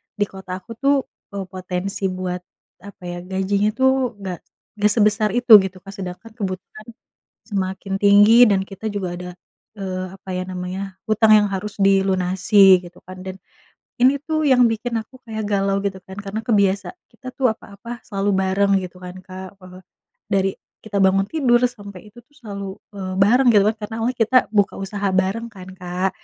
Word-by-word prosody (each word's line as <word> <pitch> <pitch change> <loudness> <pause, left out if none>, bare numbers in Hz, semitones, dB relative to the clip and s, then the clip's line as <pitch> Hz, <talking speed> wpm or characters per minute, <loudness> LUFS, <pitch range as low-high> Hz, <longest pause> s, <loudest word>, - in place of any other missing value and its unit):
di 205 - +1
kota 190 -1 -7
aku 190 - -15
tuh, 275 +1 +3 0.4
eee, 195 - -3
potensi 185 +1 -3
buat 185 -1 -4 0.4
apa 200 -2 -13
ya, 175 0 -5
gajinya 190 +2 0
tuh 260 -2 +2
nggak 185 -3 -5 0.3
nggak 210 -1 +2
sebesar 215 0 +2
itu 245 -1 0
gitu 190 -1 -5
kan. 195 0 -10
Sedangkan 195 +3 -8
kebutuhan 205 0 -6 0.6
semakin 195 -1 -3
tinggi 205 +4 +7
dan 195 -2 +2
kita 195 +2 -8
juga 200 -3 -3
ada, 180 0 -7 0.5
eee, 185 -1 -4
apa 195 0 -17
ya 185 - -2
namanya, 185 +1 -5
utang 215 0 +4
yang 210 -1 +5
harus 200 +1 -4
dilunasi 190 0 +4
gitu 175 - -13
kan. 185 0 -9
Dan 190 0 -6 0.6
ini 260 +3 +5
tuh 310 -1 0
yang 250 -2 +5
bikin 230 +1 -2
aku 255 +4 -14
kayak 220 -1 -4
galau 195 -1 +1
gitu 190 -1 -3
kan, 190 - -11
karena 205 +1 -4
kebiasa, 200 - +1 0.2
kita 255 - -11
tuh 255 -4 +2
apa-apa 220 +2 -10
selalu 200 -1 -1
bareng 190 +1 +1
gitu 180 0 -8
kan 180 0 -8
Kak, 190 +1 -10
eee, 185 0 -13 0.5
dari 195 -1 +2 0.3
kita 210 -2 -6
bangun 195 +1 +3
tidur 250 -6 +2
sampai 205 -4 -12
itu 240 - -17
tuh 290 - -33
selalu, 200 -3 -6 0.3
eee, 185 -1 -4
bareng 245 +6 +5
gitu 205 -2 +5
kan. 220 - -1
Karena 220 - -6
awalnya 245 +3 -1
kita 255 +4 +5
buka 205 -2 +2
usaha 200 +1 -5 0.2
bareng 200 +5 -3
kan 185 -3 -11
Kak, 180 +1 -2
200 Hz, 175 wpm, -21 LUFS, 190-220 Hz, 0.6 s, tinggi